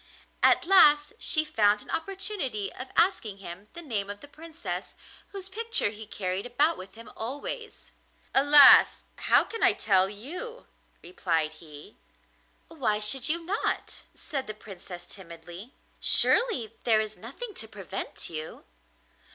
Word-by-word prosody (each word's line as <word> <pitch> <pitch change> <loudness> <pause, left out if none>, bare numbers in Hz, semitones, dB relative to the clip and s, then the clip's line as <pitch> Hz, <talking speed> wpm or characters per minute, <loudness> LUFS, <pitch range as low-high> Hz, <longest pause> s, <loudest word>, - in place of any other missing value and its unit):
At - - +3
last 300 -3 +4
she 310 -1 0
found 210 -6 +1
an - - -12
opportunity 325 - -3
of 255 - -8
asking 285 - +1
him 190 +1 -10
the 345 0 -10
name 210 -9 -3
of 205 0 -7
the 285 - -13
Princess 325 +3 -8 0.3
whose 390 -2 -9
picture 450 - +1
he 215 0 -11
carried 190 +1 -5
about 290 +7 +1
with 190 +2 -12
him 230 +1 -13
always. 290 - -7 0.4
'Alas! 285 0 +8
how - - +3
can 455 - -9
I - - +4
tell 190 -2 +2
you?' 350 - -8 0.4
replied 165 -3 -2
he. 155 +3 -14 0.7
'Why 255 -11 -2
should 245 +6 +2
you 335 +1 -2
not?' 400 +5 -3
said 275 -5 -6
the 215 - -7
Princess 185 -4 -12
timidly. 175 +4 -13 0.2
'Surely 380 - +3
there 225 -3 +2
is 215 0 -4
nothing 345 - -10
to 225 - -1
prevent 195 -2 -6
you. 155 -1 -8
230 Hz, 140 wpm, -26 LUFS, 200-330 Hz, 0.7 s, Alas